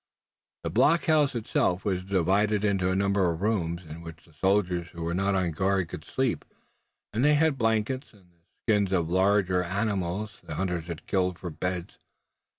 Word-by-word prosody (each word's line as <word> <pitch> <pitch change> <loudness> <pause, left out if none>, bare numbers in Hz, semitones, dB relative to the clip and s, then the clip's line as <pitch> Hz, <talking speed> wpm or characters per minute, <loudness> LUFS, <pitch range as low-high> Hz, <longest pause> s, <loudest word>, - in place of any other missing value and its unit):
The - - -3
blockhouse 155 -4 +3
itself, 100 -4 0
was 95 -3 0
divided 100 +3 +1
into 95 -3 +1
a 95 - +1
number 100 -1 +2
of 85 +2 -3
rooms, 90 -5 0
in 80 +1 -9
which 80 -1 -11
the 80 - -22
soldiers 90 0 +1
who 85 -1 -8
were 85 +1 -1
not 95 +2 +1
on 90 -3 +1
guard 95 +1 0
could 75 - -7
sleep, 130 +4 -1 0.7
and 115 +4 0
they 150 +1 +5
had 155 -1 +3
blankets 115 +3 0
and 95 -5 -23
the 85 -1 -35 0.2
skins 105 -4 +2
of 85 -4 +1
the - - -2
larger 95 -1 +3
animals 100 +1 -2
the - - -7
hunters 90 -3 -2 0.2
killed 90 -2 0
for 90 - -6
beds. 90 +2 -4
95 Hz, 175 wpm, -27 LUFS, 85-105 Hz, 0.7 s, they